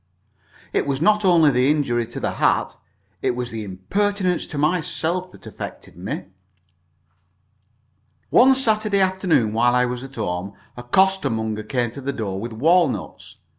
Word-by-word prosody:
It - - 0
was 135 -1 -1
not 210 +6 +3
only 170 -5 +5
the 125 +1 +2
injury 120 -6 +1
to 120 - -7
the - - -1
hat - - +1 0.5
it - - 0
was 125 0 -4
the 110 -1 -5
impertinence 180 - -1
to 150 - -6
myself 170 +3 -1
that - - -16
affected - - -9
me. - - -5 2.1
One 265 +2 +6
Saturday 215 -5 +1
afternoon, 185 - +2
while 120 +2 +3
I 125 0 +3
was 125 0 -4
at 135 0 -10
home, 95 -2 -3 0.2
a 120 - -7
costermonger 120 - +1
came 120 -3 0
to 140 - -9
the 140 +1 -3
door 100 -6 -4
with 115 +2 -5
walnuts. 140 - 0
140 Hz, 150 wpm, -22 LUFS, 115-185 Hz, 2.1 s, One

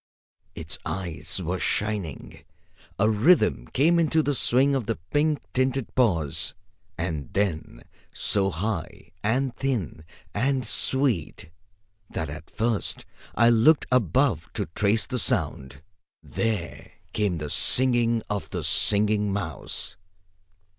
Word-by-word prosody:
Its 80 0 -5
eyes 85 -2 -4
were 90 +3 -2
shining.... 105 - -3 0.5
A 100 - +3
rhythm 105 - +3
came 165 - +3
into 160 -1 +2
the 145 - 0
swing 135 +2 +2
of 130 -6 -1
the 115 - 0
pink 145 - 0
tinted 130 0 -1
paws. 85 - +1 0.4
And 80 -5 -4
then, 85 -11 -2 0.3
so 95 -2 0
high 95 0 -4
and 125 +4 0
thin 105 - -3 0.3
and 135 -1 0
sweet 115 - 0 0.6
that 80 -2 -4
at 80 +2 -10
first 115 -1 -2 0.3
I 115 0 +5
looked 120 +7 +4
above 115 - +1
to - - -2
trace 105 +1 +2
the 130 -1 -2
sound, 70 - 0 0.4
there 110 -7 -3 0.2
came 100 -5 0
the 75 -2 -5
singing 120 -3 +4
of 105 -1 -4
the - - -4
Singing 105 0 +2
Mouse.... 85 -3 -3
105 Hz, 120 wpm, -25 LUFS, 85-125 Hz, 0.6 s, I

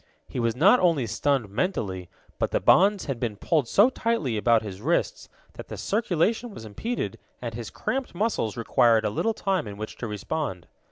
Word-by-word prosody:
He - - -5
was 115 -1 0
not 195 - +6
only 165 -8 +2
stunned 130 +2 0
mentally, 95 - -2 0.3
but - - +1
the - - +1
bonds 200 +1 +4
had 135 -5 -3
been 115 -4 -2
pulled 145 - 0
so 210 - +5
tightly 230 - -1
about 115 +1 +3
his 100 -2 -7
wrists 170 - -1 0.2
that - - -9
the - - -7
circulation 220 +2 0
was 110 - -9
impeded, 225 - -4 0.2
and - - -5
his - - -6
cramped 265 -7 -3
muscles 175 - -1
required 115 -1 +3
a 105 - 0
little 225 - 0
time 190 - -1
in 100 -1 -7
which 110 +1 -7
to 120 - -4
respond. 105 - -4
135 Hz, 185 wpm, -26 LUFS, -, 0.3 s, not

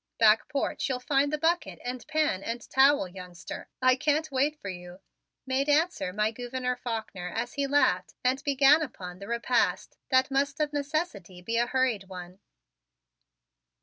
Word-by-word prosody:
"Back 220 +3 +4
porch, 285 -1 -2
you'll 255 -1 -1
find 275 +2 +1
the 305 - 0
bucket 330 +1 0
and 250 +1 -5
pan 305 -11 +1
and 230 +2 -5
towel, 270 -5 +5
youngster. 180 -2 -9
I 255 0 +6
can't 305 +3 0
wait 285 +3 0
for - - -8
you," 180 0 -9 0.5
made 270 +2 0
answer 310 - +2
my 210 +3 0
Gouverneur 250 +1 -3
Faulkner 220 -7 -5
as 240 +7 -3
he 280 0 -1
laughed 290 +1 +2
and 260 +2 +1
began 285 +2 +5
upon 180 - -6
the 200 - -9
repast 235 +1 0
that 260 +1 +3
must 280 +2 0
of 300 -1 0
necessity 280 - -3
be 230 +4 -1
a 240 +1 +2
hurried 250 -6 0
one. 180 0 -10
255 Hz, 160 wpm, -28 LUFS, 210-285 Hz, 0.5 s, I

